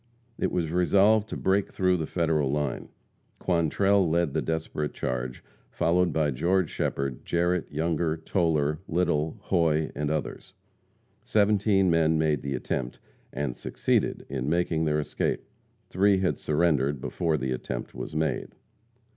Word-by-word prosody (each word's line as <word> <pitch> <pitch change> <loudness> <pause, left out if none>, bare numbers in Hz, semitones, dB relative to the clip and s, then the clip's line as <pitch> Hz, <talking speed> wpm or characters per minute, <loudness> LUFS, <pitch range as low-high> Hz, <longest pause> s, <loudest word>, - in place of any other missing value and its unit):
It - - 0
was 85 -3 -1
resolved 100 +5 +3
to - - -4
break 95 +1 +1
through 90 -1 +2
the 80 -2 -3
Federal 80 -5 +1
line. 75 -3 -2 0.5
Quantrell 95 +2 +2
led 85 -3 +1
the - - 0
desperate 80 -2 -3
charge, 60 0 -3 0.3
followed 85 +1 +2
by 75 -1 +1
George 90 +6 +1
Shepherd, 70 -2 -2
Jarrette, 85 0 0
Younger, 80 +1 0
Toler, 80 -3 0
Little, 80 0 0
Hoy 80 -6 +1
and 75 0 -2
others. 75 -1 -4 0.7
Seventeen 100 -3 +3
men 80 -1 +3
made 75 -3 +1
the 70 -1 -3
attempt, 65 0 -3 0.3
and 70 -4 -3
succeeded - - -1
in 65 0 -3
making 80 -1 +1
their 75 0 +1
escape. 75 - -2 0.5
Three 100 +2 +4
had 95 -1 0
surrendered 75 -3 +1
before 80 +4 -1
the 65 -2 -2
attempt 65 -1 -4
was - - -7
made. 80 0 -2
80 Hz, 140 wpm, -27 LUFS, 75-90 Hz, 0.7 s, Three